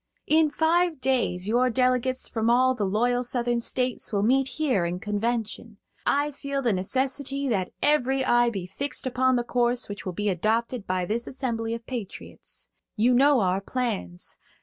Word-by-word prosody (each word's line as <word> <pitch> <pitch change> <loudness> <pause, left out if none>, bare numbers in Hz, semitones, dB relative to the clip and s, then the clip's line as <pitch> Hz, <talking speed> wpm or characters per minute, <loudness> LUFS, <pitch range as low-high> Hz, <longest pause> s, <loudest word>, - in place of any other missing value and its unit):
"In 315 0 +4
five 325 +1 +1
days 245 -8 0
your 245 +3 +3
delegates 255 +1 +1
from 225 0 -1
all 255 +2 +4
the 220 -5 -2
loyal 245 +5 +1
Southern 240 -1 0
States 250 +1 -2
will 200 -2 +1
meet 265 +4 +3
here 255 - 0
in 175 +1 -2
convention. 220 +1 -3 0.3
I 290 +1 +2
feel 280 -1 -4
the 235 -4 +2
necessity 270 +7 -1
that 190 -6 -1
every 270 -3 +2
eye 240 -1 +4
be 195 -6 -4
fixed 275 +12 -4
upon 260 0 +2
the 240 - +1
course 240 0 0
which 205 0 -7
will 185 - -4
be 205 +4 -1
adopted 220 +4 -1
by 185 -1 0
this 230 +5 -2
assembly 230 -4 -3
of 230 0 -9
patriots. 235 -7 -7 0.3
You 235 +3 +3
know 275 0 +5
our 185 0 +1
plans. 140 - -4
245 Hz, 170 wpm, -26 LUFS, 210-260 Hz, 0.3 s, know